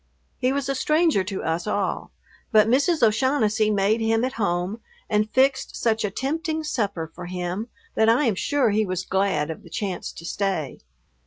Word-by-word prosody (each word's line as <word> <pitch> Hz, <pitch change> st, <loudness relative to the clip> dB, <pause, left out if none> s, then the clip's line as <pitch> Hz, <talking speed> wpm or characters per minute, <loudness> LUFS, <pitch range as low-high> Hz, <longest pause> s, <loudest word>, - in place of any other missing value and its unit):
He 255 Hz, 0 st, +2 dB
was 275 Hz, -1 st, -1 dB
a 275 Hz, -, 0 dB
stranger 305 Hz, -, +2 dB
to 195 Hz, -1 st, -4 dB
us 165 Hz, +4 st, -2 dB
all, 205 Hz, -2 st, -1 dB, 0.4 s
but 215 Hz, -2 st, +5 dB
Mrs. 280 Hz, +6 st, +2 dB
O'Shaughnessy 220 Hz, -2 st, +2 dB
made 210 Hz, +2 st, +2 dB
him 225 Hz, +1 st, +2 dB
at 260 Hz, -, -3 dB
home 190 Hz, 0 st, -1 dB, 0.3 s
and 215 Hz, 0 st, +1 dB
fixed 265 Hz, +3 st, +2 dB
such 225 Hz, -1 st, 0 dB
a 205 Hz, -, 0 dB
tempting 315 Hz, -, -2 dB
supper 200 Hz, -, -2 dB
for 180 Hz, 0 st, -8 dB
him 180 Hz, +4 st, -3 dB, 0.3 s
that 220 Hz, 0 st, +3 dB
I 245 Hz, +6 st, +4 dB
am 225 Hz, -, +2 dB
sure 255 Hz, +4 st, +1 dB
he 215 Hz, +1 st, +2 dB
was 185 Hz, -2 st, -3 dB
glad 190 Hz, -6 st, 0 dB
of 160 Hz, -, -8 dB
the -, -, -15 dB
chance 195 Hz, -4 st, -4 dB
to 165 Hz, -, -10 dB
stay. 190 Hz, -5 st, -2 dB
215 Hz, 180 wpm, -24 LUFS, 190-260 Hz, 0.4 s, but